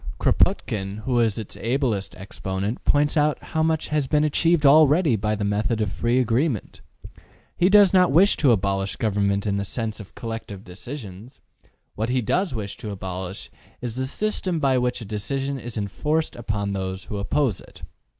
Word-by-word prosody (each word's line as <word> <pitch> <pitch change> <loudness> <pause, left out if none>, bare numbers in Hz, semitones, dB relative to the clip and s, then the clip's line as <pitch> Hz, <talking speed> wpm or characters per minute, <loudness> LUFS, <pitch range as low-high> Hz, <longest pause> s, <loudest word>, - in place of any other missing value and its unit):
Kropotkin, 100 0 0
who 125 -1 +1
is 115 -3 +2
its 110 -3 -6
ablest 115 -5 -1
exponent, 95 +3 -4
points 145 +1 +2
out 150 -1 +2
how 160 - -3
much 160 0 0
has 150 -3 0
been 150 +2 +2
achieved 155 +1 +2
already 150 0 +6
by 105 +1 -1
the 105 - -3
method 105 +3 0
of 105 -3 -1
free 120 +1 0
agreement. 125 - -1 0.7
He 180 - +3
does 200 -1 +6
not 180 -4 +5
wish 185 +8 +5
to 140 -5 +4
abolish 100 -2 0
government 100 -2 0
in 100 -1 0
the 100 - -1
sense 110 +1 -4
of 100 - -12
collective 115 -4 -6
decisions: 105 +2 -9 0.5
what 110 +3 -2
he 130 +1 +1
does 180 - 0
wish 100 -3 -5
to 115 -4 -7
abolish 95 -1 -6 0.3
is 120 -2 -5
the 130 0 -2
system 190 +1 -2
by 135 -3 +2
which 125 0 -1
a - - -6
decision 135 +7 -3
is 120 -1 -6
en 100 -1 -1
forced 155 +9 -1
upon 105 -3 -3
those 95 0 -4
who 105 - -6
oppose 110 - 0
it. - - -16
115 Hz, 180 wpm, -23 LUFS, 100-145 Hz, 0.7 s, already